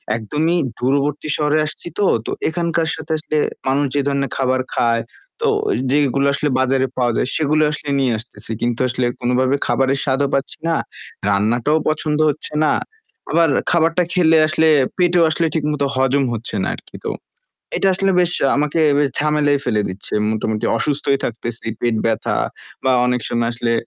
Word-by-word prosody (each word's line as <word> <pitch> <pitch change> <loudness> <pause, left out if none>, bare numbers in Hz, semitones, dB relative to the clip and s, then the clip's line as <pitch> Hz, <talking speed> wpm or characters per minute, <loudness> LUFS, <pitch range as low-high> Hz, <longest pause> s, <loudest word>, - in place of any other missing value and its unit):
একদমই 150 +10 -1 0.2
দূরবর্তী 140 +4 0
শহরে 150 0 +1
আসছিতো, 170 +5 -5 0.2
তো - - -4 0.2
এখানকার 170 0 -1
সাথে 160 +1 -8
আসলে 155 0 -3 0.3
মানুষ 140 +2 +2
যে - - +3
ধরনের 140 -1 -1
খাবার 130 -1 +1
খায়, 115 -1 +2 0.4
তো - - +2 0.2
ওই - - +1
যেইগুলো 140 -1 +2
আসলে 145 +1 0
বাজারে 130 0 +2
পাওয়া 125 -1 +2
যায়, - - 0
সেগুলো 155 0 +2
আসলে 150 -1 -5
নিয়ে 130 -2 +2
আসতেছি। 115 0 -9
কিন্তু 120 -1 -1
আসলে 125 0 -1
কোনোভাবে 125 +2 +1
খাবারের 135 +1 +1
স্বাদও 140 0 +1
পাচ্ছি 135 0 -1
না, 165 - +2 0.5
রান্নাটাও 115 +9 +2
পছন্দ 155 0 -1
হচ্ছে 150 +1 -5
না, 150 - +3 0.6
আবার 165 -2 +4 0.2
খাবারটা 165 +1 +2
খেলে 165 -3 +4
আসলে 160 0 +2 0.3
পেটেও 175 -1 +3
আসলে 165 +1 0
ঠিকমতো 150 -2 0
হজম 135 +1 +2
হচ্ছে 115 0 -5
না - - -1
আর - - -13
কি। - - -15
তো - - 0 0.7
এটা 195 - +2
আসলে 195 +1 +2
বেশ 175 -1 +3 0.3
আমাকে 150 +2 0 0.2
বেশ 145 -1 +2
ঝামেলায় 150 -1 +2
ফেলে 110 -4 +1
দিচ্ছে। 95 +2 -7 0.2
মোটামুটি 110 0 -2
অসুস্থই 140 +2 +1
থাকতেছি, 115 0 -5
পেট 120 -2 0
ব্যথা 115 -1 0 0.5
বা 130 - +3
অনেক 125 0 0
সময় 120 0 0
আসলে 120 0 -1
140 Hz, 165 wpm, -19 LUFS, 125-155 Hz, 0.7 s, আবার